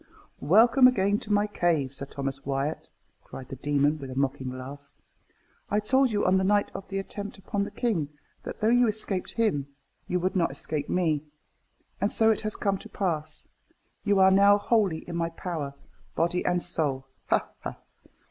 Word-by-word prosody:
"Welcome 230 - +6
again 205 -4 +2
to 210 - -7
my 205 0 +3
cave, 165 -9 0
Sir 140 0 -5
Thomas 135 -1 -5
Wyat!" 140 +2 -2 0.3
cried 130 -1 -10
the - - -6
demon, 145 +2 +1
with 135 -2 -7
a 130 - -7
mocking 135 -1 -1
laugh. 135 +3 -9 0.8
"I 210 - +2
told 260 +5 +3
you, 210 -2 0
on 185 +1 +4
the - - 0
night 205 +1 +2
of 195 - -7
the 195 - -4
attempt 200 +1 -6
upon 200 +1 -2
the - - -6
king, 190 - -1 0.3
that - - -8
though 215 - +3
you 245 0 +5
escaped 205 -3 -1
him, 185 - 0 0.4
you 180 - 0
would 185 +2 -1
not 175 -3 +2
escape 145 +2 -3
me. 160 -5 +1 0.8
And 200 - +1
so 225 0 +4
it 215 - 0
has 215 -1 -2
come 195 -1 -1
to - - -11
pass. 155 -5 -3 0.6
You 205 -2 +2
are 190 0 +6
now 200 +1 +6
wholly 205 -6 +1
in 170 - -5
my 165 0 0
power, 160 -5 -5 0.4
body 170 +2 +1
and 180 0 +1
soul 140 -6 -1 0.2
ha! - - +1
ha!" - - -6
180 Hz, 185 wpm, -27 LUFS, 145-205 Hz, 0.8 s, Welcome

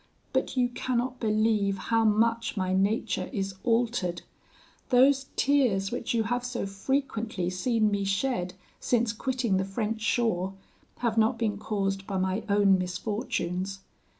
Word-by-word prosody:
But - - 0
you 250 -1 +4
cannot 250 +1 -2
believe 215 -2 +1
how 225 +3 +1
much 230 +1 +2
my 185 -1 0
nature 200 +4 0
is 195 -5 -2
altered; 230 -7 0 0.7
those 270 +2 +4
tears 245 -9 +2
which 245 - -3
you 230 -2 +2
have 245 +2 -1
so 245 -3 -3
frequently 215 -3 -2
seen 215 +3 +1
me 200 -1 0
shed 195 -2 -1 0.2
since 235 -2 +1
quitting 245 -4 0
the 190 - +1
French 215 +3 -3
shore, 195 -5 0 0.5
have 230 -2 +1
not 220 +1 +3
been 215 -3 -1
caused 195 -2 -2
by 195 - -2
my 190 +3 0
own 200 -2 +4
misfortunes. 185 0 -3
215 Hz, 140 wpm, -28 LUFS, 195-240 Hz, 0.7 s, you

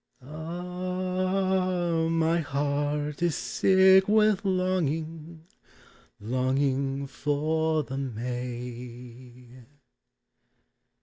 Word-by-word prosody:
Ah! 180 +1 -1
my 165 +1 +2
heart 145 +1 -2
is 175 -3 +1
sick 190 0 +4
with 210 -1 +3
longing, 165 -4 -2 0.7
Longing 135 +4 0
for 155 +3 0
the 135 0 -5
May. 125 0 -7
155 Hz, 60 wpm, -27 LUFS, 135-180 Hz, 0.7 s, sick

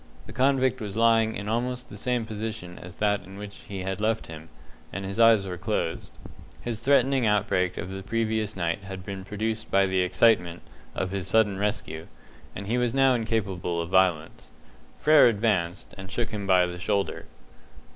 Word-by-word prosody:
The - - -11
convict 130 -1 +2
was 105 -1 -5
lying 115 -1 +3
in 105 - -5
almost 125 +3 -2
the - - -10
same 120 +2 -1
position 110 -4 -6
as 90 +1 -10
that 105 -1 0
in 95 +1 -12
which 105 0 -8
he 95 -2 -5
had 95 +2 -3
left 110 +1 0
him, 80 0 -10 0.4
and 95 +1 -5
his 100 +3 -5
eyes 115 -3 +6
were 90 -2 -5
closed. 90 -4 -2 0.5
His 115 -2 -4
threatening 135 -1 +3
outbreak 100 -3 +1
of 90 - -5
the 95 0 -6
previous 110 0 -1
night 85 +1 -1
had 95 -1 -8
been 95 -1 -6
produced 110 +2 -3
by 95 0 +4
the 95 -1 0
excitement 90 -2 +2 0.3
of 95 0 -2
his 95 -2 -3
sudden 105 -1 +2
rescue, 100 -6 -3 0.5
and 100 - -6
he 120 +4 0
was 120 0 0
now 135 -1 +5
incapable 100 -7 -1
of 85 +1 -4
violence. 90 -4 +1 0.4
Frere 155 -3 +6
advanced, 100 -6 0
and 95 0 -8
shook 120 +1 -2
him 105 -3 -4
by 90 -1 +5
the 90 0 -6
shoulder. 100 0 -1
105 Hz, 180 wpm, -26 LUFS, 95-115 Hz, 0.5 s, eyes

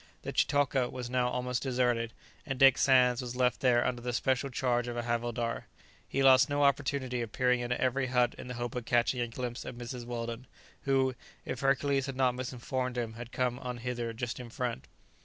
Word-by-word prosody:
The - - -4
chitoka 140 -3 +2
was 125 -1 -6
now 125 -1 +2
almost 125 0 -2
deserted, 125 -3 0 0.3
and 135 -4 -4
Dick 135 -1 +6
Sands 125 -2 +4
was 125 -1 -5
left 125 -1 +2
there 120 -2 +3
under 125 -1 -1
the 120 0 -3
special 130 +3 +1
charge 120 -1 0
of 120 0 -4
a 120 - -1
havildar: 120 0 -2 0.4
he 135 - 0
lost 130 +1 +7
no 145 0 +1
opportunity 135 -3 +1
of 115 -2 -4
peering 125 0 +2
into 120 0 -2
every 130 +1 +1
hut 125 -1 +2
in - - -9
the 125 - -5
hope 120 0 -4
of 125 -2 -4
catching 120 +1 +2
a 120 - 0
glimpse 120 +1 -5
of - - -7
Mrs. 120 0 -6
Weldon, 120 +1 -5 0.4
who, 135 -1 +2 0.3
if 130 - -4
Hercules 135 0 +1
had 135 - -4
not 130 -1 +2
misinformed 125 0 -3
him, 115 -2 -2
had 120 +1 -9
come 125 -1 -1
on 125 -2 -5
hither 120 -1 -3
just 120 +2 -4
in 125 -1 -8
front. 120 0 -4
125 Hz, 205 wpm, -31 LUFS, 120-130 Hz, 0.4 s, lost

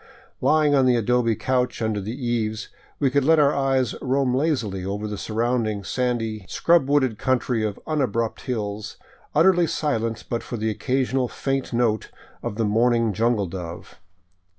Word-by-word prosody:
Lying 155 -2 +3
on 135 -2 +4
the 125 - +4
adobe 115 0 +2
couch 125 +2 0
under 110 -2 -1
the 110 +5 -5
eaves, 110 -2 -2 0.3
we 135 -3 +1
could 140 0 +2
let 160 +3 +5
our 145 -1 +4
eyes 135 -3 +1
roam 130 -1 +1
lazily 125 - 0
over 100 +3 -3
the 105 - -4
surrounding 110 -1 -1
sandy, 115 -2 -2
scrub 170 -5 +3
wooded 130 -6 +2
country 125 -3 0
of 105 -2 -3
unabrupt 120 -7 -1
hills, 105 -3 -4 0.4
utterly 175 -3 +5
silent 115 -9 -1
but 115 - -2
for 120 - -6
the 110 0 -1
occasional 130 +3 0
faint 135 +2 -3
note 115 -3 0 0.3
of 120 -3 -4
the 115 0 0
mourning 115 +1 +2
jungle 115 -1 +1
dove. 85 -2 -8
120 Hz, 155 wpm, -23 LUFS, 110-130 Hz, 0.4 s, let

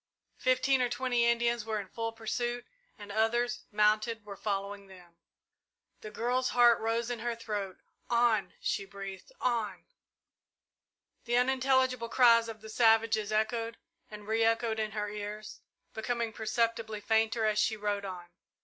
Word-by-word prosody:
Fifteen 255 +1 +2
or 245 - +1
twenty 245 -1 +1
Indians 235 -1 +1
were 220 -1 -2
in 200 - -7
full 225 +3 -4
pursuit 240 +2 -3 0.3
and 205 -1 -9
others, 240 +3 0
mounted, 215 +1 +2
were 200 -1 -8
following 200 0 -4
them. 175 -3 -16 0.8
The 215 - -8
girl's 245 +4 0
heart 240 -1 +5
rose 230 +1 -1
in 240 - -3
her 235 +1 -2
throat. 210 -5 -4 0.3
"On!" 235 -3 +2
she 200 - -1
breathed 195 - -9
"on!" 220 -7 -1 1.4
The 240 0 +1
unintelligible 260 -1 +2
cries 230 -2 +5
of 220 -1 -8
the 220 - -10
savages 225 -2 +3
echoed 225 +1 -1 0.3
and 210 -1 -10
re 225 +1 +2
echoed 225 0 +1
in 215 -1 -2
her 210 -1 -2
ears, 210 +1 -7 0.3
becoming 230 0 -2
perceptibly 225 0 -1
fainter 220 +1 +1
as 215 -1 +2
she 220 0 +1
rode 205 -1 -2
on. 185 -3 -6
225 Hz, 145 wpm, -30 LUFS, 210-235 Hz, 1.4 s, heart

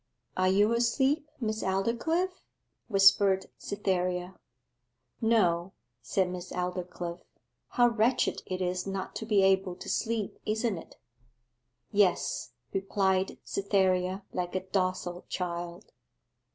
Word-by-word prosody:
'Are 185 0 +2
you 205 +4 +4
asleep, 270 +6 +2
Miss 220 -2 -2
Aldclyffe?' 235 - 0 0.5
whispered 195 -2 +5
Cytherea. 185 -2 -1 0.9
'No,' 190 -6 +2 0.3
said 185 - +1
Miss 180 0 -7
Aldclyffe. 180 -1 -4 0.5
'How 245 0 +4
wretched 235 +2 +1
it 185 0 -2
is 180 +1 -2
not 195 -1 -4
to 220 - -6
be 205 -3 +4
able 190 -1 +3
to - - -10
sleep, 225 -3 -1
isn't 220 0 0
it?' - - -14 1.0
'Yes,' 195 - +1 0.2
replied 195 -1 +1
Cytherea, 190 -1 +1
like 180 0 -3
a 185 - +1
docile 185 -2 -1
child. 175 +1 -4
190 Hz, 110 wpm, -29 LUFS, 180-215 Hz, 1.0 s, whispered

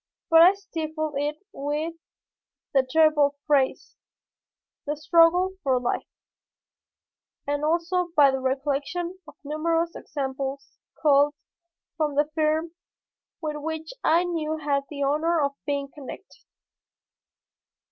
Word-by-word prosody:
But 325 0 +8
I 365 +4 +7
stifled 315 -5 -4
it 295 +6 -3
with 300 +1 -3 0.8
the 270 - +5
terrible 295 +1 +3
phrase, 280 -3 +1 0.9
"the 295 +1 -2
struggle 335 +4 +4
for 260 -2 +2
life," 245 - -2 1.4
and 290 0 -2
also 345 +3 +1
by 285 -3 +6
the 265 - -2
recollection 280 +7 -2
of 295 - -13
numerous 330 +3 -1
examples 270 -1 -5 0.2
culled 290 -1 +4 0.6
from 300 -3 0
the 295 +1 +3
firm 315 +1 +1 0.7
with 305 -1 -2
which 320 +1 -5
I 335 +2 +4
now 315 -3 -2
had 285 -2 -1
the 285 -2 -3
honor 315 +4 +1
of 280 -2 +1 0.2
being 280 -1 -1
connected. 295 +7 -11
300 Hz, 115 wpm, -25 LUFS, 280-330 Hz, 1.4 s, But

